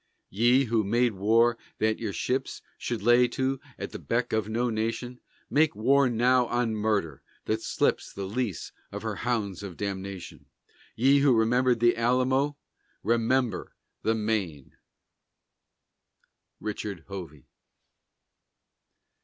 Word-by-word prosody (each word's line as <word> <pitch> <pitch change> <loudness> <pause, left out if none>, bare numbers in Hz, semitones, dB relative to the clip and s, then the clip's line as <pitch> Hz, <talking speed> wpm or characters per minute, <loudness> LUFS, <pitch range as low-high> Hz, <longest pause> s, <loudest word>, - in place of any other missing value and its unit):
Ye 120 +6 +4
who 115 -3 +1
made 120 +3 +2
war 115 +4 +3 0.2
that 110 0 +1
your 110 -3 -3
ships 130 +6 -2 0.2
Should 115 -5 -3
lay 120 +2 +5
to 130 +1 -1 0.2
at - - -6
the - - -7
beck 120 +1 -1
of 110 -1 0
no 120 +2 0
nation, 115 +3 -3 0.3
Make 150 -1 +2
war 130 +5 +3
now 125 +1 +3
on 120 -1 0
Murder, 105 - -1 0.2
that 110 +1 -1
slips - - 0
The 100 - -6
leash 105 -2 -3 0.2
of - - -6
her - - -3
hounds 105 -6 -2
of 95 -4 -8
damnation! 95 -2 -6 0.5
Ye 135 +4 +4
who 140 -3 +4
remembered 120 +1 +2
the 120 0 +5
Alamo, 130 +4 +1 0.5
Remember 115 -1 0 0.3
the 110 - +1
Maine! 105 -10 -2 1.8
RICHARD 105 -4 -5
HOVEY. 85 -8 -8
115 Hz, 125 wpm, -27 LUFS, 105-125 Hz, 1.8 s, lay